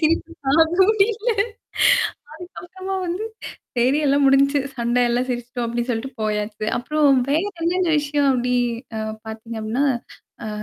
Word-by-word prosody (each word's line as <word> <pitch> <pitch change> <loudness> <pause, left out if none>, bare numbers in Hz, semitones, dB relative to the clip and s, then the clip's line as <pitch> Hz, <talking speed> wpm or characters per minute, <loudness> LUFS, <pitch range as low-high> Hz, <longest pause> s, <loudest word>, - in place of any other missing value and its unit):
சிரிப்பு 325 +1 +1 0.2
தாங்க 315 +4 +5 0.3
முடியல. 435 +2 +1 1.0
அதுக்கப்புறமா 370 +3 -8
வந்து 360 +5 -3 0.5
சரி 255 +4 +3
எல்லாம் 280 0 +3
முடிஞ்சுச்சு 275 +1 +4 0.2
சண்டை 240 +1 +1
எல்லாம் 245 +2 0
சிரிச்சுட்டோம். 245 0 -3
அப்ப்டின்னு 235 +1 -3
சொல்லிட்டு 240 +4 -3
போயாச்சு. 210 0 -2
அப்புறம் 285 0 +3
வேற 310 +4 +2 0.2
என்னென்ன 345 -1 +1
விஷயம் 290 -1 +1
அப்படி 250 0 0 0.4
அ - - -2 0.3
பார்த்தீங்க 220 +1 -7
அப்டினா, 240 +6 0 0.6
அ. - - -4
275 Hz, 130 wpm, -22 LUFS, 240-325 Hz, 1.0 s, தாங்க